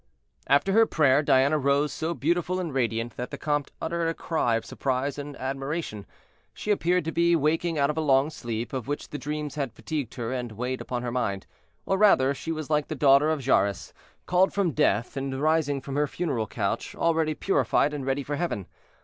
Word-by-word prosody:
After 145 +8 +3
her 225 +1 +5
prayer 145 -3 +4
Diana 140 +1 +3
rose 140 +2 +1
so 165 +1 -2
beautiful 175 +4 0
and 170 -5 -3
radiant 115 -2 -1
that 125 - -4
the - - -6
comte 145 -2 -1
uttered 170 0 -1
a 165 - -1
cry 140 -8 0
of 115 - -2
surprise 135 +2 -2
and 145 0 -7
admiration. 135 - -4 0.5
She 210 - -2
appeared 180 -3 +1
to 165 - -1
be 170 +1 +3
waking 165 +2 +1
out 140 0 +2
of 150 - -8
a - - +1
long 140 0 +3
sleep, 115 -4 -5
of 130 -4 -4
which 145 +1 -4
the 150 - -5
dreams 150 0 -4
had 140 -6 -3
fatigued 145 -7 -4
her 120 0 -3
and 120 -3 -4
weighed 125 +4 -3
upon 125 -1 -4
her 120 - -2
mind; 100 -6 -2 0.4
or 190 - 0
rather, 140 -10 +5
she 160 +4 -5
was 155 -3 -4
like 150 -1 +1
the 155 - -4
daughter 140 +1 +5
of 150 -5 -1
Jairus, 100 -7 +1 0.3
called 180 +2 +2
from 195 -4 +2
death 115 -2 +1
and 135 -1 -3
rising 150 -2 +1
from 135 +1 -6
her 150 0 +2
funeral 140 -9 -2
couch, 100 -2 -3
already 160 -2 +1
purified 150 -5 +1
and 145 -2 -4
ready 135 +1 -1
for 145 +1 -3
heaven. 140 - -2
145 Hz, 205 wpm, -26 LUFS, 130-160 Hz, 0.5 s, her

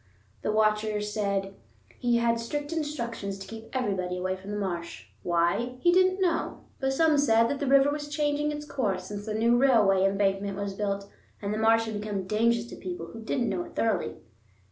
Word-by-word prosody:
The - - 0
Watcher 215 0 +2
said 200 -2 -1 0.5
he 240 -1 +2
had 235 0 +2
strict 290 +6 -3
instructions 235 -10 -3
to 195 - -8
keep 225 +1 -9
everybody 195 -8 -1
away 185 +1 -1
from 190 +1 -11
the 210 - -3
marsh. 175 -4 -4 0.2
Why? 175 +9 +1
He 345 - +4
didn't 370 +1 +4
know, 350 -3 0 0.2
but 270 -1 0
some 310 0 +4
said 230 -4 +4
that 285 - -2
the 285 - -2
river 275 +1 +5
was 295 0 -4
changing 295 0 0
its 295 0 -5
course 200 -11 -2
since 205 +2 -7
the 215 - -2
new 230 +2 +3
railway 215 -8 +4
embankment 195 0 +1
was 200 -1 -3
built, 200 0 -2 0.3
and 200 0 -3
the 215 - -2
marsh 225 +1 +4
had 215 -2 -4
become 205 -2 -3
dangerous 230 +3 +2
to - - -6
people 175 -3 -6
who 230 - -8
didn't 240 +2 -1
know 190 -4 -1
it - - -13
thoroughly. 225 -2 0
220 Hz, 195 wpm, -28 LUFS, 195-270 Hz, 0.5 s, river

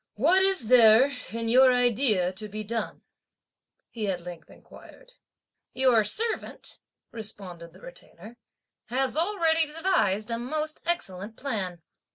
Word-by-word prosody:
"What 330 - +4
is 380 - +3
there 240 +2 +6 0.2
in 230 +1 -4
your 255 +3 +5
idea 235 -7 +2
to 215 +3 -6
be 215 +1 -6
done?" 220 +1 -5 0.9
he 215 -4 -4
at 180 -2 -3
length 170 -3 -10
inquired. - - -17 0.6
"Your 255 -4 +3
servant," 445 - -3 0.3
responded 185 -7 -8
the 185 - -18
Retainer, 205 +6 -11 0.5
"has 260 +4 -1
already 330 -2 +1
devised 295 - -1
a 230 - -2
most 305 +5 -3
excellent 215 - -4
plan. 190 - -4
230 Hz, 125 wpm, -26 LUFS, 205-300 Hz, 0.9 s, there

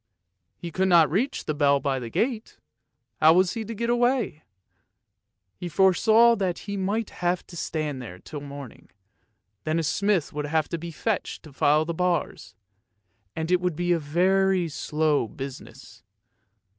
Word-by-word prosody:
He 170 - -7
could 190 +3 +1
not 170 -4 +5
reach 235 - -1
the 155 - -1
bell 140 -1 +3
by 135 -1 -1
the 120 -2 -6
gate; 225 - -2 0.6
how 160 +1 +7
was 180 0 +3
he 225 - -4
to 230 +2 -6
get 235 +3 -2
away. 240 - +1 1.1
He 175 - -6
foresaw 220 +7 +5
that 185 -3 -1
he 200 -1 -4
might 200 +3 -2
have 175 0 -2
to 175 - -13
stand 155 -5 -3
there 100 -7 -9
till 145 +9 -9
morning, 140 -3 -10 0.7
then 155 +1 -1
a 165 - 0
smith 185 +2 0
would 150 0 -3
have 155 0 0
to 170 - -3
be 170 +1 -6
fetched 200 +6 -3
to 155 -4 -13
file 150 +3 +3
the 170 - -3
bars, 180 +1 -2 0.8
and 160 +2 -3
it 180 -1 +3
would 180 -3 -1
be 175 +2 -1
a 170 - +3
very 185 +4 +2
slow 150 -3 0
business. 135 +4 -10
170 Hz, 165 wpm, -25 LUFS, 150-195 Hz, 1.1 s, how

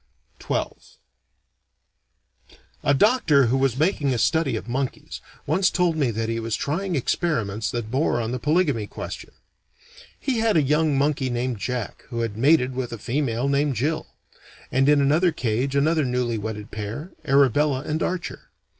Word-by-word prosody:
XII - - 0 2.2
A 145 - +2
doctor, 165 - +4
who 120 +3 +1
was 130 -2 +1
making 145 -4 +1
a - - -1
study 155 0 +1
of 110 - -5
monkeys, 130 +2 -4 0.2
once 185 +6 +2
told 180 -3 +1
me 145 -5 +1
that 115 0 -2
he 115 0 -2
was 115 -1 -2
trying 180 +5 -2
experiments 115 - -1
that 115 -2 -4
bore 130 -2 +1
on 115 0 -2
the 125 - -3
polygamy 145 - +1
question. - - -7 0.9
He 255 -5 -1
had 225 -4 +2
a 155 - +4
young 150 +1 +2
monkey 140 -1 +1
named 120 -2 -2
Jack 125 0 -4
who 115 -1 -3
had 115 -3 -2
mated 130 +2 +3
with 125 -1 -3
a 115 - -5
female 125 +1 -1
named 140 0 +1
Jill; 150 +8 -1 0.6
and 135 +2 +3
in 145 -1 +5
another 155 +6 +3
cage 125 +1 -1
another 155 +2 +2
newly 125 -3 -1
wedded 105 0 -6
pair, 110 - -6
Arabella 140 -1 +3
and 155 +2 -3
Archer. 180 -1 -4
135 Hz, 160 wpm, -24 LUFS, 120-155 Hz, 2.2 s, in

